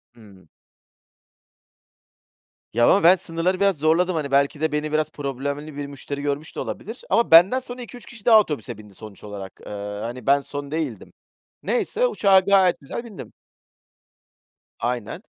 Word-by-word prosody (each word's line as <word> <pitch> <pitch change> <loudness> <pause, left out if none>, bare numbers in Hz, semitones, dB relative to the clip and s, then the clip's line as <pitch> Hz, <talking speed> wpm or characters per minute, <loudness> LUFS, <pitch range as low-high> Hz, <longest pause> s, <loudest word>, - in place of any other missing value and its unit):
Hımm. 100 -7 -18 2.2
Ya, 120 - +3
ama 200 - +4
ben 175 +3 +8
sınırları 180 +1 -2
biraz 195 -3 +2
zorladım. 165 +4 +2
Hani, 145 -3 -3
belki 140 +2 +2
de 160 - +1
beni 150 0 -2
biraz 155 0 0
problemli 140 +1 -5
bir 145 0 -4
müşteri 140 0 -7
görmüş 145 +2 -4
de - - -5
olabilir. 225 +4 -6
Ama 230 +5 +2
benden 175 +10 +7
sonra 250 -1 -9
2-3 245 +1 -11
kişi 230 -4 -13
daha 225 -2 +8
otobüse 145 - -3
bindi, 105 -2 -14
sonuç 105 -2 -12
olarak. 100 -2 -9
Eee, - - -8 0.3
hani, 120 +3 -6
ben 140 +1 +5
son 140 0 -7
değildim. 150 - -4 0.5
Neyse 245 - 0
uçağa 200 - +4
gayet 190 -1 +3
güzel 145 +11 -6
bindim. 225 -6 -11 1.5
Aynen. 120 - -3
155 Hz, 150 wpm, -23 LUFS, 135-190 Hz, 2.2 s, ben